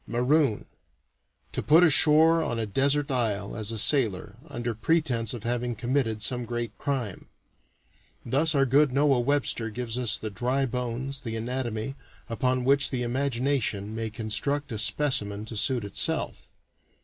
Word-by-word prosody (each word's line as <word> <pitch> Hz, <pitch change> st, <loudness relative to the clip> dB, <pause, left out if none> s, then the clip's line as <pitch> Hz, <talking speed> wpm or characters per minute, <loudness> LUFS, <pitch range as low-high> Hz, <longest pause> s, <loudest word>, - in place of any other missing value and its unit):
"Maroon 125 Hz, 0 st, +1 dB, 0.9 s
to -, -, -3 dB
put 160 Hz, +4 st, +5 dB
ashore 160 Hz, +1 st, +5 dB
on 120 Hz, -7 st, -2 dB
a 115 Hz, -, -1 dB
desert 140 Hz, +6 st, +1 dB
isle, 105 Hz, -6 st, -1 dB
as 110 Hz, -1 st, -1 dB
a 115 Hz, -, -4 dB
sailor, 110 Hz, -5 st, +1 dB
under 120 Hz, -4 st, -3 dB
pretense 120 Hz, -2 st, 0 dB
of 120 Hz, -4 st, -6 dB
having 120 Hz, 0 st, -2 dB
committed 115 Hz, -2 st, -1 dB
some 125 Hz, +1 st, 0 dB
great 120 Hz, -2 st, -4 dB
crime." 125 Hz, -9 st, -3 dB, 1.0 s
Thus 150 Hz, +6 st, +2 dB
our 135 Hz, -1 st, +4 dB
good 140 Hz, +2 st, +3 dB
Noah 140 Hz, -1 st, +3 dB
Webster 120 Hz, -3 st, 0 dB
gives 120 Hz, +1 st, -4 dB
us 120 Hz, -4 st, +2 dB
the 110 Hz, -, -5 dB
dry 125 Hz, +7 st, 0 dB
bones, 125 Hz, +2 st, -4 dB
the 115 Hz, -4 st, -5 dB
anatomy, 120 Hz, 0 st, -3 dB, 0.4 s
upon 125 Hz, +2 st, 0 dB
which 140 Hz, +1 st, +4 dB
the 125 Hz, -2 st, -2 dB
imagination 120 Hz, -4 st, -1 dB
may 110 Hz, 0 st, -3 dB
construct 120 Hz, +6 st, -2 dB
a 110 Hz, -, -3 dB
specimen 110 Hz, -4 st, -1 dB
to 110 Hz, -, -8 dB
suit 120 Hz, +2 st, 0 dB
itself. 100 Hz, -, -2 dB
125 Hz, 150 wpm, -27 LUFS, 110-140 Hz, 1.0 s, put